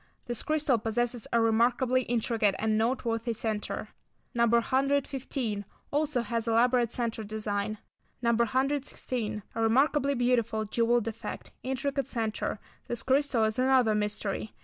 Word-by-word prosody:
This 240 -2 -3
crystal 300 -6 +1
possesses 235 +1 -1
a 235 - +3
remarkably 240 +3 +3
intricate 225 -4 +1
and 220 0 +1
noteworthy 230 0 0
centre. 215 -1 -3 0.4
No. 235 -1 +3
115. 260 -2 0 0.3
Also 290 -3 +1
has 235 -1 -2
elaborate 235 +1 +3
centre 230 -2 -2
design. 215 0 -2 0.4
No. 235 -1 +2
116. 255 -3 -1
A 225 - -2
remarkably 275 +5 +3
beautiful, 235 -3 +1
jewelled 230 +2 +1
effect; 225 0 -6
intricate 265 +1 -2
centre. 225 -5 -2 0.3
This 240 - -4
crystal 265 -3 +2
is 220 +2 0
another 255 -4 +4
mystery. 210 0 -2
235 Hz, 125 wpm, -29 LUFS, 220-260 Hz, 0.4 s, another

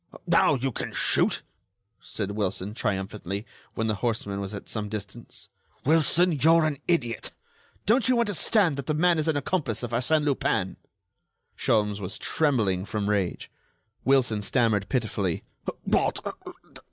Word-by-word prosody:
"Now, - - +4
you 135 +1 -1
can - - -5
shoot," - - +2 0.6
said 100 -2 -4
Wilson, 100 -1 -2
triumphantly, 100 -1 -3 0.3
when 110 - -1
the 110 - +1
horseman 110 -4 -1
was 100 0 -4
at 100 -2 -7
some 105 -2 -3
distance. 105 +2 -7 0.4
"Wilson, 165 +4 +4
you're 160 +2 +4
an 145 -3 -1
idiot! 120 -10 0 0.5
Don't 240 +4 +3
you 250 -2 +4
understand 205 -6 +2
that 140 - -5
the 155 - +1
man 170 +1 +3
is 155 - -1
an 155 -2 +2
accomplice 135 - -1
of 120 - -4
Arsène 130 +6 +2
Lupin?" 145 -2 0 0.8
Sholmes 105 -2 +1
was 95 -1 -3
trembling 110 - +1
from 105 0 -2
rage. 95 -4 -1 0.5
Wilson 125 -6 +3
stammered 110 -2 +1
pitifully: 105 -8 -1 0.4
"What!... - - +1
115 Hz, 140 wpm, -26 LUFS, 105-155 Hz, 0.8 s, Now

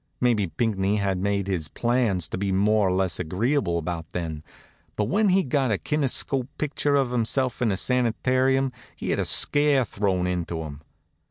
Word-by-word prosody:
Maybe 115 -6 +2
Pinckney 100 +3 0
had 100 -3 0
made 100 0 0
his 90 -6 -2
plans 115 -4 0
to - - -4
be 100 0 -1
more 105 +1 +3
or - - +1
less 95 0 0
agreeable 90 - 0
about 80 0 -5
then; 80 -3 -4 0.5
but 105 - 0
when 205 - +2
he 190 +1 +3
got 135 -1 0
a 105 - +1
kinetoscope 135 -2 -1
picture 145 -1 0
of 135 -3 +1
himself 125 +1 -1
in 115 -4 +2
a 95 - -1
sanitarium 130 +3 +1 0.2
he - - -4
had - - 0
a - - 0
scare 145 -3 +4
thrown 95 -4 -1
into 85 -2 -2
him. 75 -1 -8
105 Hz, 175 wpm, -25 LUFS, 90-130 Hz, 0.5 s, scare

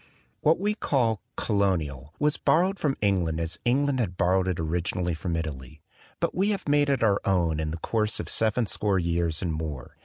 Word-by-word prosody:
What 155 +2 +3
we 205 +2 +1
call 120 - 0
" - - -49
Colonial" 80 - 0
was 150 0 +2
borrowed 185 +4 +2
from 140 -3 0
England 90 -6 +1
as 85 +1 -3
England 135 +2 +2
had 90 -7 -2
borrowed 95 0 +2
it 90 -3 -1
originally 85 +2 -1
from 85 +1 -3
Italy; 75 -3 -6 0.4
but - - 0
we 195 +3 +1
have 200 -5 -2
made 145 0 +3
it 135 -4 +1
our 100 -3 +3
own 85 -5 +1
in 80 0 -1
the 80 - -4
course 105 +4 -1
of - - -4
seven 110 +2 +1
score 100 -1 0
years 85 -2 0
and 85 -3 -1
more. 75 -5 -5
95 Hz, 195 wpm, -26 LUFS, 80-125 Hz, 0.4 s, What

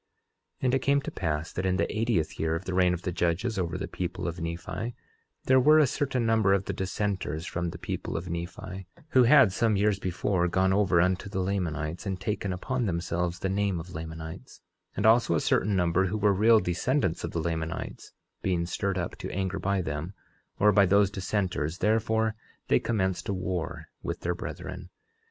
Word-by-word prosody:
11:24 - - -2
And 125 - +3
it 135 - +3
came 140 +2 +2
to - - -5
pass 80 -2 -2
that 95 - -2
in 95 0 +1
the - - -1
eightieth 110 -7 0
year 80 0 +1
of 85 +3 -5
the 95 - -3
reign 90 -1 +4
of 90 - -9
the 90 - -1
judges 90 +6 0
over 85 -2 -1
the - - -4
people 90 0 -4
of 85 +1 -4
Nephi, 85 +8 -4 0.5
there 130 0 +5
were 150 +4 +6
a 155 - +6
certain 130 -2 -1
number 110 -3 +3
of 100 0 +1
the - - -3
dissenters 95 -4 -2
from 85 0 -2
the 85 - -7
people 85 - -4
of 85 +2 -5
Nephi, 90 +2 -6 0.2
who 130 -4 +5
had 130 -6 +6
some 110 0 +2
years 100 0 +2
before 90 -1 0
gone 95 +2 +2
over 95 -3 +3
unto 90 +2 +1
the 95 - -3
Lamanites, 90 -2 -2
and 95 -1 -2
taken 100 0 -2
upon 120 +6 -2
themselves 85 0 -1
the 95 - -2
name 100 -2 0
of 85 +2 -9
Lamanites, 80 0 -8 0.4
and - - 0
also 110 -5 +5
a - - +2
certain 100 +6 +1
number 90 +1 +2
who 105 +4 -2
were 105 -1 +3
real 110 +3 +5
descendants 90 - 0
of - - -2
the 85 - -3
Lamanites, 80 0 -4 0.3
being 90 -3 0
stirred 95 +2 -2
up 85 - -3
to - - -5
anger 95 0 -2
by 95 0 0
them, 80 +5 -4 0.4
or 105 +1 +5
by 100 -1 +5
those 100 +1 +4
dissenters, 90 -5 -2
therefore 110 +1 +1 0.4
they - - +5
commenced 95 -6 -1
a - - +1
war 90 -2 -3 0.2
with - - -4
their 90 - 0
brethren. 90 - -7
95 Hz, 200 wpm, -28 LUFS, 85-105 Hz, 0.5 s, were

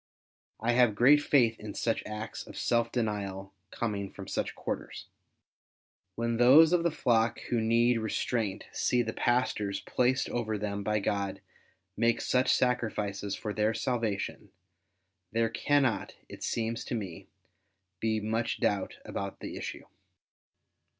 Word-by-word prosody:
I 115 +2 +1
have 120 -3 +4
great 140 +7 +6
faith 120 -6 +3
in 105 -1 -7
such 115 - 0
acts 110 +1 -6
of - - -10
self 115 -1 +1
denial 100 -4 -3 0.2
coming 100 -3 -3
from 100 -1 -9
such - - -2
quarters. - - -5 1.1
When 115 0 -1
those 145 +8 +7
of 175 - +4
the 170 - +2
flock 115 -7 +1
who 120 -2 +2
need 115 +1 +3
restraint 110 -1 -1
see 125 -1 +1
the 110 -1 -4
pastors 105 -5 0
placed 130 +2 +1
over 110 -3 -1
them 100 -1 -3
by 105 +1 0
God 100 -1 -1 0.6
make 115 0 +2
such 130 0 +2
sacrifices 105 -5 0
for 105 -2 -4
their 105 +1 +1
salvation, 110 -5 -2 0.8
there 115 0 +1
cannot, 130 -3 +1
it - - -11
seems 115 0 -2
to - - -3
me, 95 -7 -6 0.7
be 110 0 0
much 110 +2 -1
doubt 100 -2 0
about 100 0 -5
the - - -6
issue. - - -6
115 Hz, 135 wpm, -30 LUFS, 105-120 Hz, 1.1 s, those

